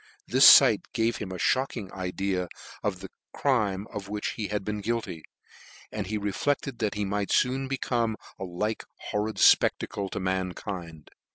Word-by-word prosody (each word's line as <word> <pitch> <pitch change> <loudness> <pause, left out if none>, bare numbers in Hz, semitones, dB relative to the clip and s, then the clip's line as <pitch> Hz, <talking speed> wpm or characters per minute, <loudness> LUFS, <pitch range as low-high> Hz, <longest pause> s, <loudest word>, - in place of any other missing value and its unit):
The - - +1
fight - - +9
gave 115 +1 +1
him 95 -3 -6
a 90 - -5
(hocking 120 -2 -1
idea 95 -1 -2 0.3
of 95 -3 -2
the 95 - -9 0.2
crime 105 -8 0
of 100 -2 -6
which 105 0 -2
he 105 - -4
had 105 -2 -3
been 105 0 -3
guilty, 110 -7 -3 0.7
and 105 -3 -4
he 105 +2 -2
reflected 120 +5 -2
that 110 -1 -1
he 105 0 -1
might 100 0 -2
foon 130 +1 +2
become 120 -4 -1 0.2
a - - -4
like 95 +5 -3
horrid 105 +1 -3
fpcc^acle 100 -1 +3
to - - -4
mankind. 90 -3 -4
105 Hz, 160 wpm, -27 LUFS, 95-110 Hz, 0.7 s, fight